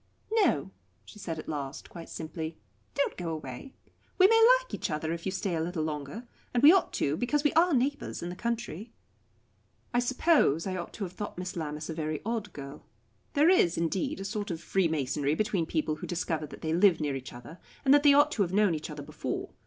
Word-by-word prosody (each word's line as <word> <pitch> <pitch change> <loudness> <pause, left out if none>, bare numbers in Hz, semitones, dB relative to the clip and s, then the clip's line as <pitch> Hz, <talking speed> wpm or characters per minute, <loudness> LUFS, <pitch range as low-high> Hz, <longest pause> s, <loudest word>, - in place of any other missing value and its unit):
"No," 375 - +2 0.3
she 210 - -13
said 165 -5 -4
at 155 - -8
last, 145 -1 -5
quite 170 -2 -10
simply, 160 0 -6 0.4
"don't 280 - 0
go 175 -2 -3
away. 155 - -7 0.4
We 370 - +7
may 450 +2 +5 0.2
like - - -12
each - - -2
other, 155 +1 -2
if 170 +2 -5
you - - 0
stay 190 -1 -2
a 160 - 0
little 165 -1 -2
longer 155 - -5 0.3
and 240 - +2
we 295 - +11
ought 380 0 +3
to 145 +1 0
because 285 - 0
we 295 - +2
are 340 +2 +4
neighbours 275 - -1
in 175 - -3
the 175 - -6
country." 230 -1 -4 1.0
I 240 - +3
suppose 245 - +3
I 190 -1 -2
ought 175 -2 -5
to 210 - -5
have 180 -2 -5
thought 205 -2 -6
Miss 180 0 -5
Lammas 155 -2 -4
a 165 - -4
very 155 -1 -3
odd 220 -3 -2
girl. 140 -2 -9 0.5
There 310 +4 +5
is, 175 - +4
indeed, 170 +3 -1
a 195 - -5
sort 205 0 -3
of 165 -3 -3
freemasonry 150 -5 0
between 200 -4 0
people 155 -1 -1
who - - -7
discover 165 -3 -2
that - - -12
they 160 0 -1
live 180 -1 +5
near 145 -3 -1
each 130 -1 -7
other, 120 +8 -11 0.3
and 270 - +6
that 290 - +6
they 285 -1 +6
ought 290 +1 +5
to 230 - -1
have 180 -3 +1
known 205 -2 +3
each 155 +1 -4
other 150 -2 -7
before. - - -5
175 Hz, 220 wpm, -29 LUFS, 155-235 Hz, 1.0 s, we